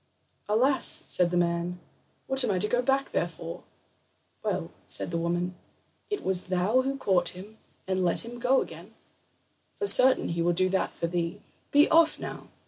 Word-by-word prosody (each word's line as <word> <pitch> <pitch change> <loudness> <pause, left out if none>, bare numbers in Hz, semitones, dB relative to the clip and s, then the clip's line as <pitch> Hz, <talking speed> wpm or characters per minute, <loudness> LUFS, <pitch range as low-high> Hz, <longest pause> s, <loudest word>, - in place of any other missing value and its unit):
"Alas," 260 +6 +3
said 180 -1 +1
the 175 - -1
man, 175 +1 -1 0.5
"what 265 0 +4
am 245 - 0
I 195 - +1
to 200 +4 0
go 245 +3 +1
back 270 +2 0
there - - 0
for?" - - -9 0.8
"Well," - - -3 0.2
said - - -2
the 170 - -1
woman, 175 +2 -1 0.6
"it 415 - -3
was 185 -1 -1
thou 185 +7 +1
who 270 +1 -3
caught 180 -8 +1
him 210 +4 -12 0.3
and 185 0 0
let 175 +5 +1
him 240 +1 -9
go 255 +2 +3
again; 175 +7 -13 0.8
for 410 - -3
certain 260 -9 +4
he 170 0 -2
will 175 +1 +2
do 185 +2 +1
that 190 0 -1
for - - -3
thee. 170 +2 -2 0.3
Be 290 +1 +5
off 330 0 +4
now!" - - -7
190 Hz, 180 wpm, -27 LUFS, 175-255 Hz, 0.8 s, Be